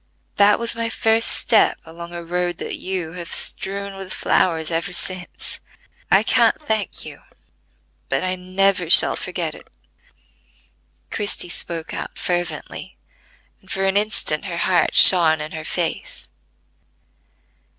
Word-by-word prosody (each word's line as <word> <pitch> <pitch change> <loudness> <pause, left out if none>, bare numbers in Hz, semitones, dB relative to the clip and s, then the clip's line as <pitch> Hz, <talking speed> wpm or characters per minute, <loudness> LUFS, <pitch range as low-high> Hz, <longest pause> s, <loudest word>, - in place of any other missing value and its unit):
That 205 0 +5
was 235 0 +1
my 230 0 -2
first 225 0 +4
step - - +3
along 170 +1 -10
a 170 0 -7
road 175 0 -2
that - - -5
you 185 -4 -4
have 175 -1 -8
strewn 200 0 -1
with 195 -1 -9
flowers 160 -2 0
ever 165 +2 -2
since. 185 0 -3 0.5
I - - +4
can't - - +3
thank 220 -9 -3
you, - - -10 0.9
but - - -1
I 185 0 -1
never 185 -1 0
shall - - +6
forget - - -4
it." - - -14 1.4
Christie 205 -3 -1
spoke 170 -2 -3
out - - -6
fervently, 175 -3 -4 0.6
and 190 - -23
for 195 - -2
an 195 0 +1
instant 205 -7 +1
her 175 -3 -5
heart 180 -2 +1
shone 165 -4 +7
in 150 0 -6
her 160 -1 -7
face. 165 +1 -4
180 Hz, 135 wpm, -20 LUFS, 170-195 Hz, 1.4 s, shone